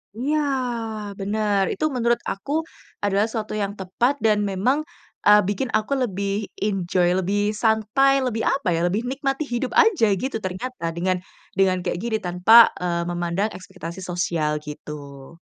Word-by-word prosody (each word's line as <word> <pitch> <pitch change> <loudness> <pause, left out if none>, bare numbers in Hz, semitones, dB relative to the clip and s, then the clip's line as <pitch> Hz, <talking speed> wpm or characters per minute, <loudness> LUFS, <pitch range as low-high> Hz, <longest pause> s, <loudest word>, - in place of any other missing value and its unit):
Iya, 290 +6 0 0.8
bener. 205 0 0
Itu 250 - -2
menurut 235 -1 +2
aku 195 +8 -6 0.5
adalah 205 +2 +2
suatu 220 -1 -4
yang 200 0 -2
tepat 195 +8 +1
dan 215 -1 +4
memang, 200 +9 +1 0.5
eee, 210 0 +8
bikin 205 +6 -1
aku 215 +6 -2
lebih 200 -1 -2 0.2
enjoy, 185 -3 +1
lebih 205 +3 0
santai, 220 +5 +2
lebih 225 -3 -1
apa 270 -9 +1
ya, 165 - 0
lebih 210 +6 -1
nikmati 270 +2 -1
hidup 245 -2 -3
aja 405 - +5
gitu 255 +4 -3
ternyata 185 +2 -5
dengan 180 +1 0 0.4
dengan 190 -1 +3
kayak 175 -1 -2
gini 225 0 -1
tanpa, 180 +7 +7
eee, 170 -1 -1
memandang 175 +4 -1
ekspektasi 180 -1 -8
sosial 175 -4 -1
gitu. 145 0 -9
205 Hz, 145 wpm, -23 LUFS, 180-235 Hz, 0.8 s, eee